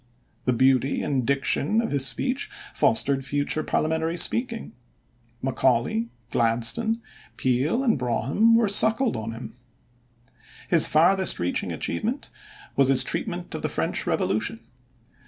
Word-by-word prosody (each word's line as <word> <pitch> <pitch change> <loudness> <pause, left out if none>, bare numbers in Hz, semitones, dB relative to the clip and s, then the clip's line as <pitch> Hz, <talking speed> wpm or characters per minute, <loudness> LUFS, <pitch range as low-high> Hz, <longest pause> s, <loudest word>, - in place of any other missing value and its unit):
The 125 - +1
beauty 130 +2 +1
and 130 -4 -2
diction 140 +8 +1
of 230 - -2
his 135 -2 +3
speech 255 - -1 0.2
fostered 135 -1 +2
future 145 +3 -2
parliamentary 160 +2 -2
speaking. 230 +6 0 0.7
Macaulay, 120 -3 0 0.2
Gladstone, 120 - +1 0.4
Peel, 135 - 0
and 230 - +1
Brougham 130 - +1
were 230 -1 +2
suckled 225 +5 +3
on 110 -1 -5
him. 115 +2 -9 1.2
His - - +6
farthest 185 +5 +4
reaching 90 +1 -2
achievement 225 - -4 0.4
was 135 - +3
his 135 -1 +7
treatment - - -5
of - - -5
the - - -3
French - - -2
Revolution. 110 +4 -1
140 Hz, 120 wpm, -24 LUFS, -, 1.2 s, his